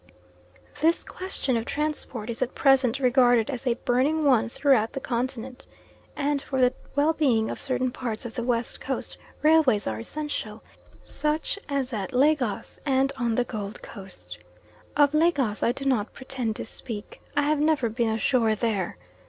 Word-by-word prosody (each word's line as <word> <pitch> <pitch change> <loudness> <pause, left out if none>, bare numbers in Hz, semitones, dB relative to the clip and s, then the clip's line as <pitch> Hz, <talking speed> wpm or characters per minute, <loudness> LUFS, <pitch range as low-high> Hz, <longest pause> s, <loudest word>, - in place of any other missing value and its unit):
This 330 +2 +3
question 365 -9 -2
of 230 - 0
transport 275 -6 -3
is 235 - -7
at 255 - -1
present 270 -4 +4
regarded 245 -2 +4
as 255 0 -5
a 240 - +3
burning 275 +6 +1
one 245 -4 +4
throughout 265 -4 +2
the - - -3
Continent; 250 0 -4 0.5
and 285 -1 0
for 265 -1 -3
the 250 0 +4 0.2
well 295 +3 +3
being 245 -9 +2
of - - -6
certain 255 -1 +1
parts 235 -3 -4
of 230 - -6
the - - -3
West 235 -1 -1
Coast - - -4 0.2
railways 305 -9 +4
are 110 0 -2
essential, 225 - -5 0.4
such 305 +6 -1
as 270 -3 -1
at 210 +4 -3
Lagos, 260 -5 +1
and 270 -1 +2
on 235 -3 0
the 245 - +2
Gold 215 -2 -6
Coast. 195 -3 -10 0.6
Of 290 -1 +5
Lagos 290 -9 +2
I - - +3
do 270 +2 -5
not 245 -5 +1
pretend 255 -4 -3
to - - -5
speak. 225 -2 -8 0.2
I 290 - +4
have 300 0 +2
never 300 -5 +2
been 230 +1 0
ashore 220 0 +2
there. 210 -4 -1
255 Hz, 165 wpm, -26 LUFS, 230-285 Hz, 0.6 s, Of